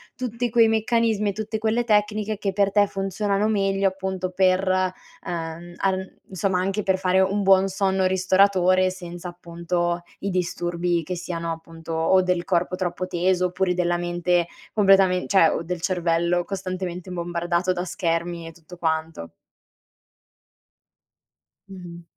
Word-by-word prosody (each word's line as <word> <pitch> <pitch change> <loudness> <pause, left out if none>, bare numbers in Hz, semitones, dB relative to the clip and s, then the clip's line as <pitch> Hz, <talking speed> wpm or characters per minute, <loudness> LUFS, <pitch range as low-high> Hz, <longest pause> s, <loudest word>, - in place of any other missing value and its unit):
tutti 245 -1 -3
quei 230 -1 +5
meccanismi 225 -1 +1
e - - -2
tutte 220 +2 -4
quelle 220 +2 +1
tecniche 210 -1 +1
che 195 -1 -2
per 200 0 +2
te 205 0 +4
funzionano 195 +1 -1
meglio 195 -2 +1
appunto 190 -1 -4
per, 185 +1 +2
uhm, 175 -2 -3
arn 190 -1 -2
insomma, 190 0 0
anche 195 +3 -1
per 190 -1 +1
fare 185 0 +2
un 195 +2 +1
buon 190 0 +5
sonno 190 -1 0
ristoratore 185 0 +3
senza, 175 -1 -8
appunto, 175 0 -3 0.2
i 200 - -3
disturbi 175 -1 -1
che 180 +4 -4
siano, 170 -1 -4
appunto, 165 0 -8
o 165 +4 +3
del 180 -1 0
corpo 180 0 0
troppo 180 0 -2
teso, 180 +1 +1
oppure 180 0 0
della 175 -1 0
mente 175 0 0 0.3
completamen 195 -3 +4
cioè, 190 -5 +5
o - - -2
del 175 0 -4
cervello 175 -1 +1
costantemente 185 -2 -5
bombardato 175 +1 -1
da 175 0 -3
schermi 170 -1 -2
e - - -8
tutto 170 +2 -14
quanto. 160 - -2 2.4
Mh-mh. 175 -3 -10
185 Hz, 140 wpm, -23 LUFS, 175-195 Hz, 2.4 s, quei